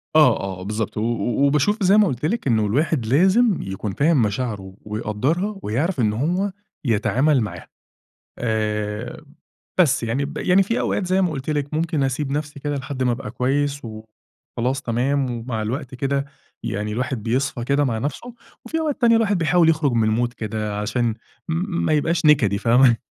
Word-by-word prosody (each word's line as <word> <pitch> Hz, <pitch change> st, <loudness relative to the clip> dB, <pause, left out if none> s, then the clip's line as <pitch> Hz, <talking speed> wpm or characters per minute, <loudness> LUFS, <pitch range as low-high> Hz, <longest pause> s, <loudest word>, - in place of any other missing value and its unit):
آه، 150 Hz, -7 st, +6 dB, 0.2 s
آه، -, -, -7 dB
بالضبط، 105 Hz, +2 st, -3 dB
و -, -, 0 dB
و 120 Hz, +3 st, 0 dB
وباشوف 150 Hz, +10 st, +2 dB
زي 195 Hz, +3 st, +5 dB
ما 210 Hz, -2 st, +5 dB
قلت 130 Hz, 0 st, -3 dB
لك 220 Hz, -3 st, -1 dB
إنه 110 Hz, -3 st, +2 dB
الواحد 135 Hz, +2 st, 0 dB
لازم 190 Hz, -, +4 dB
يكون 95 Hz, +1 st, -4 dB
فاهم 145 Hz, +1 st, +3 dB
مشاعره 105 Hz, -3 st, -2 dB
ويقدرها 130 Hz, -, -2 dB
ويعرف 140 Hz, -, -1 dB
إنه 105 Hz, -2 st, +2 dB
هو 180 Hz, -, 0 dB, 0.3 s
يتعامل 130 Hz, +5 st, +2 dB
معاها 105 Hz, -, -5 dB, 0.7 s
آآ، 110 Hz, +2 st, -2 dB, 0.5 s
بس 140 Hz, -9 st, +3 dB
يعني 125 Hz, +5 st, -1 dB
ب 150 Hz, +1 st, -7 dB
يعني 185 Hz, +2 st, +3 dB
في 230 Hz, +5 st, -1 dB
أوقات 190 Hz, -, -1 dB
زي 190 Hz, +1 st, +2 dB
ما 175 Hz, -3 st, +1 dB
قلت 135 Hz, 0 st, -5 dB
لك 145 Hz, -1 st, -2 dB
ممكن 160 Hz, -2 st, 0 dB
أسيب 135 Hz, +1 st, -1 dB
نفسي 145 Hz, 0 st, -3 dB
كده 145 Hz, 0 st, -2 dB
لحد 130 Hz, -1 st, -3 dB
ما 125 Hz, -, +2 dB
ابقى 120 Hz, -3 st, -4 dB
كويس 140 Hz, +3 st, 0 dB
وخلاص 115 Hz, +4 st, -6 dB
تمام، 130 Hz, +2 st, 0 dB
ومع 115 Hz, -2 st, -4 dB
الوقت 130 Hz, +4 st, -4 dB
كده 140 Hz, +1 st, -1 dB, 0.4 s
يعني 105 Hz, -2 st, -3 dB
الواحد 125 Hz, -1 st, -3 dB
بيصفى 125 Hz, +1 st, -1 dB
كده 140 Hz, +3 st, +2 dB
مع 115 Hz, -5 st, 0 dB
نفسه، 150 Hz, -, -4 dB, 0.3 s
وفي 325 Hz, -, -2 dB
أوقات 305 Hz, -3 st, -1 dB
ثانية 230 Hz, -1 st, +5 dB
الواحد 205 Hz, -4 st, +2 dB
بيحاول 165 Hz, 0 st, +3 dB
يخرج 155 Hz, -4 st, +2 dB
من 115 Hz, -, +2 dB
المود 120 Hz, +2 st, 0 dB
كده 105 Hz, -2 st, -4 dB
عشان 115 Hz, +3 st, 0 dB, 0.4 s
م 170 Hz, +2 st, -1 dB
ما 155 Hz, -, +2 dB
يبقاش 160 Hz, +2 st, +1 dB
نكدي 120 Hz, -10 st, +4 dB
فاهمة 120 Hz, +2 st, +4 dB
135 Hz, 175 wpm, -22 LUFS, 115-155 Hz, 0.7 s, آه